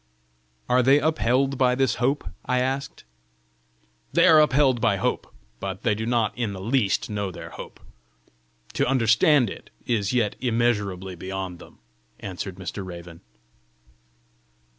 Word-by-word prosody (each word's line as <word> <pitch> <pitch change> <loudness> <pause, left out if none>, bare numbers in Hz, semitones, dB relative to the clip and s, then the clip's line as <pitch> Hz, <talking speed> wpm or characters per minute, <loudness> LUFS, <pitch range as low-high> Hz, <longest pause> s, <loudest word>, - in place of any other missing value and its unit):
"Are 125 +1 +4
they 135 +3 +5
upheld 135 -2 +1
by 125 -1 +3
this 130 -3 +1
hope?" 135 +4 0 0.2
I 125 - 0
asked. 135 +2 -3 1.1
"They - - +5
are 155 -1 +7
upheld 135 -4 +3
by 110 -3 +3
hope, 100 - -2 0.3
but 95 +3 -5
they 115 - +2
do 110 +2 -4
not 115 -3 +1
in 110 -3 -2
the 95 - -7
least 105 -3 0
know 100 -2 -2
their 90 - -9
hope; - - -10 0.9
to - - +1
understand 125 +2 +4
it, - - -11 0.2
is 105 -5 0
yet 120 -4 +1
immeasurably 105 -6 0
beyond 95 0 -6
them," - - -15 0.4
answered 95 -1 -6
Mr. 95 +1 -6
Raven. 85 -2 -10
115 Hz, 140 wpm, -24 LUFS, 95-130 Hz, 1.1 s, are